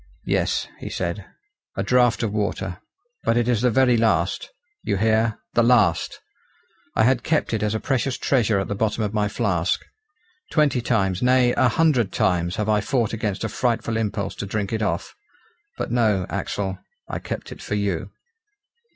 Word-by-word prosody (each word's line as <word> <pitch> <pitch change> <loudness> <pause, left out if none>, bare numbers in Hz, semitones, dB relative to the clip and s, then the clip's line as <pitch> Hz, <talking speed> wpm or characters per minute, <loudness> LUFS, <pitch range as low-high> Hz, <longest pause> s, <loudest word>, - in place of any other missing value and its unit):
"Yes," - - 0
he - - -6
said, - - -3 0.5
"a - - 0
draught 125 -2 +3
of 105 -2 -1
water; 100 -3 -2 0.4
but 115 +1 +2
it 120 -1 +1
is 120 -3 +2
the 125 - +4
very 125 0 +4
last 110 -1 +1 0.3
you 100 -3 -1
hear! 110 +2 +2 0.2
the 120 - +4
last. 115 -8 +3 0.8
I - - +4
had 125 +1 +3
kept 155 -6 0
it 110 - 0
as 105 0 0
a - - -1
precious 135 0 -1
treasure 115 -6 +2
at 95 - -2
the - - -2
bottom 110 +2 0
of 105 0 -2
my 105 -1 +1
flask. 100 -5 0 0.6
Twenty 145 -6 +2
times, 95 -6 0
nay, 125 -1 +4
a 125 - +4
hundred 130 -6 +2
times, 85 -1 +1
have 105 -1 -2
I 105 -1 +3
fought 115 +1 0
against 105 -3 -2
a - - 0
frightful 115 0 -1
impulse 100 -3 -2
to 100 - -4
drink 100 +1 -2
it 110 - -1
off. 100 -3 -2 0.6
But - - -3
no, 110 -6 +2
Axel, 95 -2 -3 0.3
I - - -4
kept - - -6
it - - -9
for - - -3
you." 100 -3 -1
110 Hz, 175 wpm, -23 LUFS, 100-120 Hz, 0.8 s, the